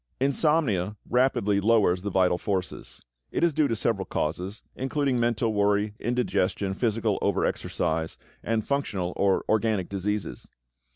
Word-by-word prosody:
= - - -46
Insomnia 125 - +1
rapidly 125 -6 +2
lowers 100 -4 +3
the 100 - -3
vital 90 -2 +2
forces. 95 -8 -4 0.2
It - - -1
is 170 -2 +3
due 155 0 +3
to 115 - -1
several 105 -3 -1
causes, 90 +7 -3
including 135 -1 0
mental 115 -1 +1
worry, 105 0 +2
indigestion, 105 -5 0
physical 115 +1 0
overexercise, 80 0 -1 0.2
and 110 -1 -1
functional 100 -11 -1
or 100 -1 +2
organic 110 -4 +1
diseases. 100 -7 -3
105 Hz, 130 wpm, -26 LUFS, 95-120 Hz, 0.2 s, lowers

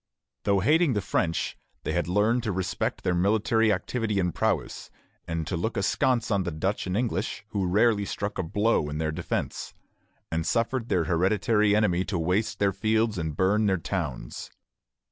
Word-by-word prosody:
Though 100 -1 +3
hating 150 - +3
the 105 - +1
French, 80 -3 -1 0.3
they - - -2
had - - 0
learned 105 +6 +2
to 110 -3 -2
respect 95 -1 -2
their 90 - +1
military 110 +4 +2
activity 105 +1 -1
and 90 -3 0
prowess, - - -1 0.4
and 80 -1 -2
to 90 - -3
look 100 +7 -2
askance 115 +4 +1
on 100 -2 +2
the 90 - -2
Dutch 95 +6 -2
and 90 +2 -1
English, 120 -3 -2
who 100 -4 -1
rarely 105 +2 +3
struck 100 0 -4
a - - +1
blow 100 -2 +1
in 75 - -4
their 80 0 -1
defence, 75 - -4 0.6
and 80 0 0
suffered 115 +5 0
their 85 - +2
hereditary 105 +5 +2
enemy 95 -4 +2
to 100 - -2
waste 95 +6 0
their 100 0 +2
fields 110 0 +1
and 80 -2 -3
burn 105 +3 +3
their 95 -1 +2
towns. 80 -6 -4
100 Hz, 175 wpm, -27 LUFS, 90-110 Hz, 0.6 s, Though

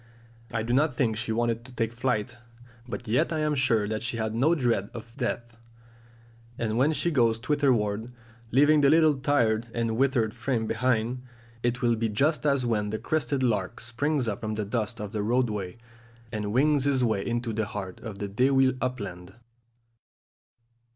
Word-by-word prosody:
I 115 -1 -1
do 120 +2 -1
not 145 0 +2
think 120 -4 +1
she 110 +1 -3
wanted 115 0 0
to 130 - -14
take 115 -2 -2
flight, 120 -1 -1 0.5
but 125 0 -6
yet 125 +11 +2
I 155 -1 -1
am 150 0 +1
sure 120 -6 +2
she 120 -1 -3
had 110 -1 -2
no 140 +9 +3
dread 120 - 0
of 115 0 -9
death; 120 -3 -3 1.0
and 110 -2 -1
when 140 +5 +4
she 170 +2 0
goes 115 -6 +3
thitherward, 120 -4 0 0.4
leaving 145 +5 +5
the 140 - +5
little 155 0 +5
tired 120 -6 +1
and 115 -1 0
withered 125 -5 +2
frame 120 -1 -1
behind, 120 +1 0 0.4
it 120 +1 -1
will 120 -1 +3
be 115 0 -1
just 150 +9 +1
as 140 -3 +2
when 105 -3 0
the 110 - -2
crested 145 0 -1
lark 110 -3 0
springs 125 +3 -1
up 105 -3 -3
from 110 0 -3
the 105 -1 -2
dust 115 +2 -2
of 105 -1 -5
the 110 -2 -2
roadway, 105 -4 -1 0.5
and 105 -1 -3
wings 140 +3 +3
his 135 -3 +2
way 110 -4 +1
into 120 -1 -2
the 110 -1 -1
heart 95 -3 -6
of 110 -3 -7
the 100 - -4
dewy 130 +5 +3
upland. 100 -7 -4
120 Hz, 175 wpm, -27 LUFS, 110-130 Hz, 1.0 s, leaving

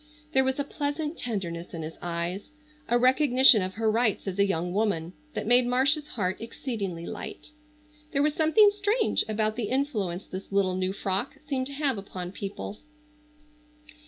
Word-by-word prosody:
There 265 -2 +5
was 265 0 0
a 285 - 0
pleasant 295 +2 -3
tenderness 175 - -4
in 165 - -5
his 160 +1 -8
eyes, 175 +5 -3 0.4
a 240 - +4
recognition 255 -2 +6
of 185 0 -3
her 220 0 +1
rights 225 -2 +1
as 195 0 -3
a 200 - +5
young 175 -1 -1
woman, 185 -5 0 0.2
that - - -2
made 245 +2 +5
Marcia's 275 +5 +2
heart 190 -6 -2
exceedingly 205 -7 -4
light. - - -7 0.6
There 280 -1 +2
was 300 0 +2
something 325 +7 +5
strange 415 +3 +1
about 215 +1 0
the 225 -4 -2
influence 215 - -1
this 190 +2 -8
little 195 -2 +2
new 185 0 -1
frock 195 +7 -2
seemed 265 -3 -1
to 280 - -8
have 275 -6 0
upon 185 -2 -6
people. 200 +1 -6
220 Hz, 165 wpm, -27 LUFS, 185-275 Hz, 0.6 s, recognition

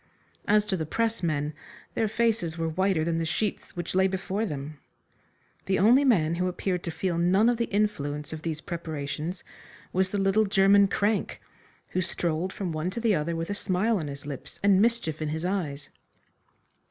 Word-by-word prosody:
As 210 0 +4
to 195 - -1
the 160 -4 -3
pressmen, 160 -9 0 0.4
their 220 - +1
faces 215 -7 0
were 165 0 -1
whiter 185 0 +1
than 165 -1 0
the - - 0
sheets 195 +5 -2
which 175 -1 -4
lay 190 +1 +4
before 195 +3 -2
them. 145 -1 -6 0.9
The 190 0 +2
only 240 +8 +6
man 175 - +3
who 180 +2 0
appeared 180 0 -2
to - - -2
feel 170 +1 -1
none 190 +6 +4
of 240 -1 +3
the 235 - +1
influence 150 -10 -1
of 155 - -6
these 155 -1 -3
preparations 160 +1 -4 0.5
was 185 0 +2
the 205 - -2
little 195 +2 +3
German 200 0 +5
crank, 205 +2 0 0.5
who 185 - 0
strolled 175 0 -2
from 185 -3 -4
one 155 +2 -2
to 200 - -4
the 230 -2 +2
other 165 0 0
with 165 +4 -3
a - - +1
smile 200 +2 0
on 155 - -4
his 140 0 -7
lips 145 -3 -7
and 200 -1 +5
mischief 220 -10 +1
in 155 - -1
his 160 +3 -3
eyes. 155 -7 -2
185 Hz, 185 wpm, -27 LUFS, 160-205 Hz, 0.9 s, only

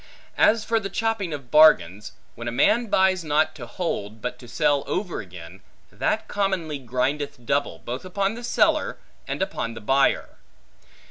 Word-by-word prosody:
As 220 0 +4
for 230 0 +1
the 195 -2 -5
chopping 225 -6 -1
of 140 -5 -7
bargains, 110 - +5 0.2
when 120 +1 -7
a - - -1
man 230 - +3
buys 190 -3 +2
not 155 0 +1
to 120 -5 -9
hold 110 - -4
but 125 +2 -5
to 120 - -12
sell 140 +3 +1
over 185 -2 -2
again, 90 0 -12 0.3
that - - -1
commonly 190 -7 -1
grindeth 130 +1 -2
double, 140 +4 0
both 125 +3 -4
upon 195 +2 -1
the 240 +1 -8
seller, - - +1 0.3
and - - -1
upon 115 0 -4
the - - -7
buyer. 135 +5 +1
145 Hz, 160 wpm, -24 LUFS, 120-190 Hz, 0.3 s, bargains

